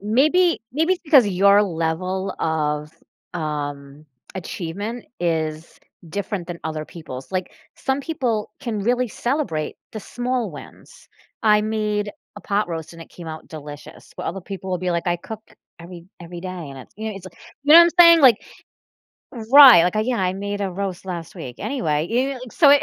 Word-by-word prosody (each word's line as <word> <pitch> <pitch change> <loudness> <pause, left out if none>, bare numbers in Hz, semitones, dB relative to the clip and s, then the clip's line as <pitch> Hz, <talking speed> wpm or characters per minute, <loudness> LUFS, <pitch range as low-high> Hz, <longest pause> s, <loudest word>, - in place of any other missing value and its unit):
Maybe 305 - +3
maybe 320 +6 +2
it's 365 - -15
because 290 - +6
your 200 +1 +5
level 185 +1 -2
of, 150 -2 -1 0.4
um, 145 -2 -5 0.3
achievement 195 +6 -5
is 160 -2 -2 0.3
different 195 0 -4
than 175 -1 -6
other 155 -1 -3
people's. 145 -3 -10
Like, 185 -1 -3 0.2
some 265 +1 -2
people 255 -8 -2
can 230 -6 -3
really 245 +4 +1
celebrate 240 - -2 0.2
the 215 - -6
small 245 -1 -3
wins. 145 -4 -14 0.3
I 210 -1 +4
made 210 -1 -1 0.3
a - - -8
pot 200 -1 0
roast, 165 -1 -5
and 165 - -13
it - - -16
came 175 - -11
out 160 0 -8
delicious, 150 0 -11
but - - -5
other 195 +4 -4
people 190 0 -7
will 180 - -1
be 180 0 -2
like, 170 0 -2
"I 175 0 +1
cook 215 +5 -8 0.4
every 170 0 -11 0.2
every 170 0 -9
day," 185 - -6 0.2
and 135 - -10
it's 130 - -13
you 220 +1 -4
know, 205 - -7
it's, 190 - -11
like, - - -14 0.3
you 295 - +5
know 335 - +12
I'm 340 0 +6
saying? 335 -1 +9
Like 255 -6 +7 1.2
Right, 275 -11 +10
like, 180 +3 0
I - - +3
"Yeah, 240 +2 -1
I 185 -1 +1
made 200 +1 -4
a 195 -1 -1
roast 190 -1 -4
last 170 -3 -6
week. 125 -1 -8
Anyway." 160 - -1
You 240 +2 +2
you 275 +1 -1
know? 255 - -9
So 300 - +5
it 285 0 +6
190 Hz, 185 wpm, -22 LUFS, 165-235 Hz, 1.2 s, know